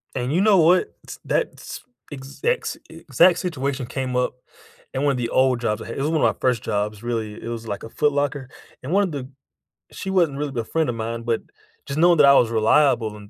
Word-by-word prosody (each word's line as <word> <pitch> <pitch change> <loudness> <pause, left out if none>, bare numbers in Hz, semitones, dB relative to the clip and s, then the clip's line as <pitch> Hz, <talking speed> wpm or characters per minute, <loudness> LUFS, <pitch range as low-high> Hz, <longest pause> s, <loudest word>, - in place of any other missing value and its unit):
And 125 +1 -2
you 175 - +2
know 205 -1 +5
what? 175 +2 +3
It's - - -10
that's - - -3 0.3
exact 145 - -3
s - - -4
exact 180 -2 +3
situation 140 -7 -3
came 130 0 -3
up 125 0 +1 0.6
in 130 - -1
one 145 -1 +2
of 130 - -3
the 120 -1 -2
old 130 0 +2
jobs 110 -2 -2
I - - -9
had- 115 - -7
It - - -3
was 150 - 0
one 160 -1 0
of - - +5
my - - 0
first 125 -4 +1
jobs, 105 +1 -3
really.- 115 -3 -3
It - - -6
was, 115 -1 -6
like, 100 - -4
a 115 - -9
Foot 150 +4 +1
Locker, 145 -2 -2 0.3
and 130 - -6
one 200 +2 +4
of 185 - -4
the 135 -3 -6 0.6
She 190 - -6
wasn't 170 -7 +1
really 140 -4 -3
a - - -1
friend 160 +6 -1
of 120 - -2
mine, 115 +1 -4
but 115 -1 -1 0.4
just 140 +2 -4
knowing 175 +1 +5
that 145 - +7
I 140 - +7
was 120 -4 +4
reliable 115 0 +2
and 105 -1 -13
130 Hz, 240 wpm, -22 LUFS, 115-150 Hz, 0.6 s, that